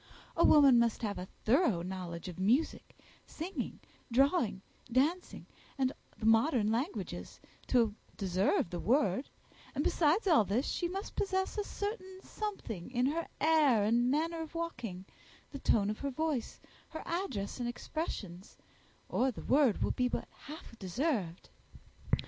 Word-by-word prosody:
A 335 Hz, -, +3 dB
woman 280 Hz, -5 st, +7 dB
must 235 Hz, 0 st, +1 dB
have 205 Hz, -3 st, -2 dB
a 180 Hz, -, -6 dB, 0.2 s
thorough 230 Hz, -, +3 dB
knowledge 180 Hz, -2 st, -5 dB
of 180 Hz, -1 st, -7 dB
music, 240 Hz, +12 st, +1 dB, 0.3 s
singing, 350 Hz, +5 st, -5 dB, 0.3 s
drawing, 255 Hz, -, +2 dB, 0.3 s
dancing, 305 Hz, +9 st, 0 dB, 0.3 s
and 265 Hz, 0 st, +1 dB, 0.2 s
the 215 Hz, -, -5 dB
modern 225 Hz, 0 st, +4 dB
languages, 265 Hz, -, -3 dB, 0.3 s
to 230 Hz, -4 st, +3 dB, 0.2 s
deserve 185 Hz, -2 st, +1 dB
the 175 Hz, -, -3 dB
word; 240 Hz, -, +1 dB, 0.5 s
and, -, -, 0 dB
besides 335 Hz, +7 st, +2 dB
all 320 Hz, -, +5 dB
this, 210 Hz, +7 st, 0 dB
she 350 Hz, -, -1 dB
must 385 Hz, +3 st, -5 dB
possess 380 Hz, -1 st, -1 dB
a 415 Hz, -, -1 dB
certain 405 Hz, -2 st, -5 dB
something 315 Hz, -, -5 dB
in 250 Hz, 0 st, +1 dB
her 325 Hz, +5 st, -1 dB
air 295 Hz, -8 st, +4 dB
and 235 Hz, +3 st, +3 dB
manner 325 Hz, +4 st, 0 dB
of 320 Hz, +1 st, -8 dB
walking, 235 Hz, -, -4 dB, 0.5 s
the 280 Hz, -, -6 dB
tone 210 Hz, -5 st, +2 dB
of 215 Hz, -, -6 dB
her 280 Hz, -, -2 dB
voice, 285 Hz, -3 st, -2 dB, 0.3 s
her 315 Hz, -, -7 dB
address 265 Hz, -, -3 dB
and 240 Hz, -1 st, -1 dB
expressions, 210 Hz, -, -5 dB, 0.5 s
or 260 Hz, -, +1 dB
the 245 Hz, -, -7 dB
word 270 Hz, -5 st, +3 dB
will -, -, +1 dB
be 250 Hz, -, +1 dB
but -, -, -3 dB
half 300 Hz, -5 st, -11 dB
deserved." 195 Hz, -, -2 dB
255 Hz, 145 wpm, -32 LUFS, 210-320 Hz, 0.5 s, woman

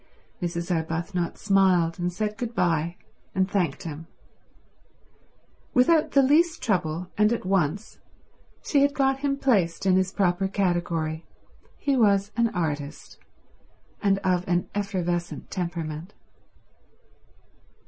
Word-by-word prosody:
Mrs. 170 Hz, 0 st, -2 dB
Arbuthnot 165 Hz, +2 st, -2 dB
smiled 185 Hz, -4 st, +2 dB
and 175 Hz, 0 st, -1 dB
said 210 Hz, +3 st, -2 dB
good 235 Hz, +1 st, -5 dB
bye 170 Hz, -2 st, +1 dB, 0.4 s
and 190 Hz, 0 st, +2 dB
thanked 185 Hz, -8 st, -1 dB
him. 160 Hz, 0 st, -7 dB, 1.7 s
Without 300 Hz, +5 st, +4 dB
the 275 Hz, -, +6 dB
least 320 Hz, +5 st, +3 dB
trouble 180 Hz, -5 st, -1 dB
and 210 Hz, +1 st, +5 dB
at 235 Hz, -, -2 dB
once 190 Hz, +1 st, -1 dB, 0.6 s
she 285 Hz, -, +2 dB
had 285 Hz, +1 st, +2 dB
got 270 Hz, -1 st, +2 dB
him 275 Hz, 0 st, 0 dB
placed 195 Hz, -12 st, +1 dB
in 185 Hz, -1 st, +4 dB
his 190 Hz, 0 st, +1 dB
proper 190 Hz, -1 st, +1 dB
category: 175 Hz, -4 st, -1 dB, 0.5 s
he 280 Hz, -1 st, 0 dB
was 205 Hz, -4 st, +3 dB
an 235 Hz, -1 st, +2 dB
artist 150 Hz, -3 st, -4 dB, 0.8 s
and 195 Hz, -1 st, +3 dB
of 180 Hz, -1 st, +1 dB
an 175 Hz, 0 st, +1 dB
effervescent 180 Hz, -4 st, -3 dB
temperament. 170 Hz, -1 st, -4 dB
185 Hz, 115 wpm, -25 LUFS, 170-210 Hz, 1.7 s, the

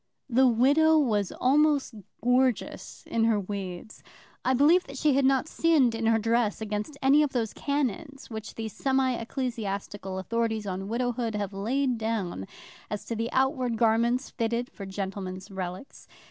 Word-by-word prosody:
The 260 Hz, +2 st, +5 dB
widow 285 Hz, +7 st, +4 dB
was 215 Hz, -10 st, +1 dB
almost 285 Hz, 0 st, +2 dB, 0.3 s
gorgeous 250 Hz, -1 st, 0 dB
in 225 Hz, -1 st, +1 dB
her 225 Hz, -2 st, +3 dB
weeds. 195 Hz, 0 st, -6 dB, 0.4 s
I 260 Hz, -, +2 dB
believe 315 Hz, +7 st, +5 dB
that 275 Hz, -, -9 dB
she 295 Hz, +1 st, +3 dB
had 275 Hz, 0 st, +3 dB
not 270 Hz, +2 st, +3 dB
sinned 315 Hz, -8 st, +3 dB
in 225 Hz, 0 st, -1 dB
her 225 Hz, 0 st, +4 dB
dress 225 Hz, -1 st, +1 dB
against 215 Hz, +6 st, -4 dB
any 280 Hz, +3 st, +6 dB
of 295 Hz, -2 st, 0 dB
those 230 Hz, -4 st, -1 dB
canons 280 Hz, 0 st, -3 dB
which 220 Hz, -2 st, -7 dB
the 225 Hz, -1 st, -4 dB
semi 265 Hz, +4 st, +1 dB
ecclesiastical 210 Hz, -6 st, -4 dB
authorities 220 Hz, +2 st, -1 dB
on 190 Hz, 0 st, -4 dB
widowhood 235 Hz, -1 st, -1 dB
have 205 Hz, -1 st, -3 dB
laid 245 Hz, +5 st, 0 dB
down 205 Hz, -, -2 dB, 0.4 s
as 210 Hz, -, -4 dB
to 230 Hz, -, -3 dB
the 230 Hz, +1 st, -2 dB
outward 260 Hz, -3 st, +1 dB
garments 235 Hz, +3 st, +2 dB
fitted 235 Hz, +2 st, -2 dB
for 195 Hz, -, -8 dB
gentlemen's 190 Hz, 0 st, -5 dB
relicts. 185 Hz, +4 st, -7 dB
230 Hz, 155 wpm, -27 LUFS, 210-265 Hz, 0.4 s, any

